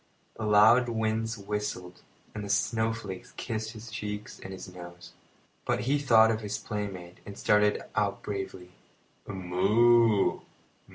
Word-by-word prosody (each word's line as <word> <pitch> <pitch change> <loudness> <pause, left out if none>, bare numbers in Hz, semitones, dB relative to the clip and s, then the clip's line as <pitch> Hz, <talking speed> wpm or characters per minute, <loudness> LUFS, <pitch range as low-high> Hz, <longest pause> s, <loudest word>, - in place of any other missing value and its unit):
The 110 - -4
loud 110 +4 +6
winds 110 0 -1
whistled, 100 -3 -5 0.3
and 105 - -5
the 100 - -6
snowflakes 110 -2 -1
kissed 110 -1 -4
his 115 +1 -10
cheeks 105 -1 -6
and 95 - -9
his 95 -1 -8
nose; 90 -1 -11 0.5
but - - 0
he 140 +6 +1
thought 115 -5 +5
of 110 0 -2
his 105 0 -3
playmate 100 -5 -6
and 100 0 -10
started 105 0 +2
out 100 -1 0
bravely. 95 -3 -5 0.6
"Moo! 105 +4 +3
105 Hz, 130 wpm, -28 LUFS, 95-110 Hz, 0.6 s, loud